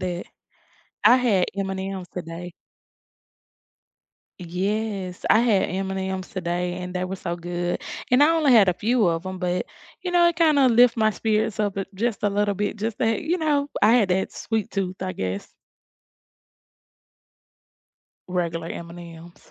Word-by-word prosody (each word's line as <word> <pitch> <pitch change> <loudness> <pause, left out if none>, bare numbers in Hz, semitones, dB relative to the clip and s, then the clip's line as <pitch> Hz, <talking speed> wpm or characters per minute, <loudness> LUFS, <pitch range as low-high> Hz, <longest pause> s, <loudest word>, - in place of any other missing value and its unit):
that. 180 -1 -3 0.8
I 250 - +7
had 210 -8 +2
M&M's 190 -1 -4
today. 175 0 -7 1.9
Yes. 190 +1 -3
I 220 - +6
had 225 -5 +2
M&M's 190 0 -3
today, 175 -1 -2
and 180 0 -6
they 180 0 -1
were 190 +1 -4
so 175 -2 -4
good 175 0 -3 0.3
and 250 +3 +5
I 300 - +6
only 315 -5 +3
had 215 -5 +6
a - - +4
few 225 +2 +2
of 165 +1 -1
'em, 185 0 -5
but, 180 0 -1 0.4
you 360 - -3
know, 350 -1 +5
it, 340 - -2
kinda, 305 -5 +4
lift 240 0 +5
my 220 -1 +3
spirits 215 0 0
up, 205 -2 -1
a, 195 - -1
just, 220 +1 -2
a 205 - +2
little 205 0 +1
bit, 205 +2 -2
just, 215 +1 -3
that, 225 -2 +1
you 345 +4 0
know, 290 -2 +1
I 215 +2 +6
had 230 -6 +4
that 190 +1 0
sweet 220 -2 -3
tooth, 190 -2 -3
I 185 0 -2
guess. 95 - -4 2.8
Regular 170 -2 -2
M&M's. 170 0 -10
195 Hz, 155 wpm, -24 LUFS, 180-225 Hz, 2.8 s, I